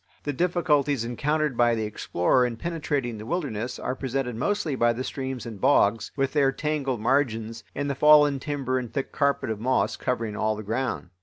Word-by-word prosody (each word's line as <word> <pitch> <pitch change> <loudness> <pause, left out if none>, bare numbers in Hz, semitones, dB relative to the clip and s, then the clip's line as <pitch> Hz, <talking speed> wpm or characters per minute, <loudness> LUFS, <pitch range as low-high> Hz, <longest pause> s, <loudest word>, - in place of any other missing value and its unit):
The 145 - -2
difficulties 150 -6 +1
encountered 150 +4 0
by 120 0 +3
the 110 - -2
explorer 105 +2 +1
in 120 -2 -1
penetrating 145 -7 -2
the 105 - -8
wilderness 125 -8 -3
are 125 - -3
presented 130 -2 -3
mostly 165 - -1
by 120 -1 +3
the 125 +3 -4
streams 130 -3 -4
and 110 -4 -8
bogs, 115 -5 +3
with 135 -1 0
their 140 -3 +3
tangled 140 -5 -2
margins, 115 -3 0
and 145 0 -2
the 140 - 0
fallen 150 0 +6
timber 130 -2 -2
and 120 -3 -6
thick 135 +3 -3
carpet 140 -5 0
of 110 - -4
moss 130 +4 +1
covering 115 -4 -2
all 110 0 0
the 105 - -7
ground. 115 -4 -3
130 Hz, 185 wpm, -26 LUFS, 115-145 Hz, -, fallen